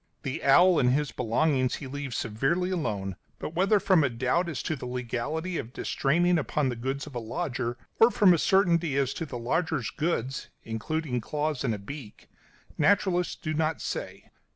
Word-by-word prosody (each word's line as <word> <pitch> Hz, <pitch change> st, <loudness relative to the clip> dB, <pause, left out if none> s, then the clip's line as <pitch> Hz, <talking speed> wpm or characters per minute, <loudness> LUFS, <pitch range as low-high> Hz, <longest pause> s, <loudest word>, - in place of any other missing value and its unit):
The 135 Hz, -2 st, -4 dB
owl 175 Hz, +5 st, +6 dB
and 125 Hz, -, +4 dB
his 145 Hz, -3 st, -1 dB
belongings 130 Hz, +3 st, +1 dB
he 145 Hz, -, -7 dB
leaves 135 Hz, -1 st, -5 dB
severely 135 Hz, -, 0 dB
alone; 100 Hz, -, -2 dB, 0.2 s
but 155 Hz, -, -6 dB
whether 195 Hz, +4 st, +3 dB
from 185 Hz, -5 st, +4 dB
a 140 Hz, -, +2 dB
doubt 130 Hz, +9 st, 0 dB
as 155 Hz, -, -4 dB
to 155 Hz, -, -1 dB
the 125 Hz, -, -7 dB
legality 125 Hz, +8 st, -3 dB
of 120 Hz, -, -7 dB
distraining 175 Hz, +5 st, +1 dB
upon 145 Hz, -1 st, 0 dB
the 125 Hz, -, -3 dB
goods 135 Hz, +4 st, -3 dB
of 150 Hz, -, -11 dB
a 120 Hz, -, -3 dB
lodger, 120 Hz, 0 st, -3 dB, 0.2 s
or 225 Hz, -, +8 dB
from 200 Hz, -6 st, +5 dB
a 170 Hz, -, +2 dB
certainty 170 Hz, -6 st, +3 dB
as 135 Hz, -1 st, +1 dB
to 165 Hz, -, -5 dB
the 125 Hz, -, -5 dB
lodger's 130 Hz, +1 st, -1 dB
goods 140 Hz, -5 st, -2 dB
including 125 Hz, +4 st, -2 dB
claws 150 Hz, +2 st, -2 dB
and 115 Hz, -, 0 dB
a -, -, -5 dB
beak, 110 Hz, +2 st, -10 dB, 0.5 s
naturalists 185 Hz, -3 st, +2 dB
do 155 Hz, -4 st, -4 dB
not 155 Hz, 0 st, 0 dB
say. -, -, -5 dB
145 Hz, 180 wpm, -28 LUFS, 125-170 Hz, 0.5 s, or